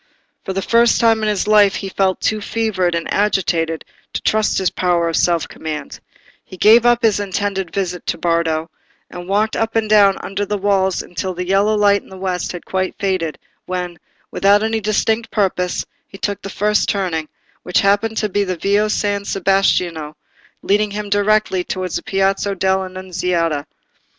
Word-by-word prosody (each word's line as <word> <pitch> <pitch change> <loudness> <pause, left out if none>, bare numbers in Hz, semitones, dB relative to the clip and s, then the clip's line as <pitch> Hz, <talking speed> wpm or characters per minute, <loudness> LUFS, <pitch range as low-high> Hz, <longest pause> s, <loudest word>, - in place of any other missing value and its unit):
For 190 - -4
the 195 0 -2
first 235 +2 +3
time 225 -1 +3
in 215 - +1
his 205 -1 -1
life 210 -1 +5
he 195 - -4
felt 190 -1 0
too 215 -1 0
fevered 200 -6 -1
and 170 - -2
agitated 170 -5 0 0.3
to - - -3
trust 215 0 +1
his 190 - +1
power 175 -2 +1
of 165 - -1
self 170 -2 +1
command; 150 -3 -6 0.4
he 185 - -12
gave 225 +5 +6
up 240 0 +3
his 215 -3 +3
intended 195 -2 -2
visit 180 -3 -3
to - - -1
Bardo, 165 -1 0 0.4
and 175 0 -8
walked 210 +2 +1
up 225 0 -1
and 225 -1 +1
down 205 -2 +5
under 195 +1 -3
the 205 +1 -2
walls 190 -2 +1
until 185 +1 -5
the 180 +1 -3
yellow 200 +3 +2
light 200 -1 +3
in - - -20
the 190 - -11
west 185 -2 -2
had 175 - -8
quite 185 0 -2
faded, 185 -5 -1 0.3
when, 180 -1 -4 0.3
without 205 +2 +3
any 225 0 0
distinct 220 +2 0
purpose, 185 -3 -1 0.2
he 195 - -12
took 205 0 -3
the 195 - -7
first 210 +2 +1
turning, 175 -6 -1 0.3
which 180 - +1
happened 205 +3 +1
to 215 - +1
be 205 0 0
the 185 -2 -3
Via 205 +4 +1
San 205 -1 -1
Sebastiano, 180 -6 0 0.5
leading 210 +1 +2
him 205 0 -5
directly 205 -2 +2
towards 185 -1 -3
the - - -6
Piazza 195 +1 0
dell' 190 0 +1
Annunziata. 180 -5 -2
195 Hz, 180 wpm, -18 LUFS, 180-210 Hz, 0.5 s, gave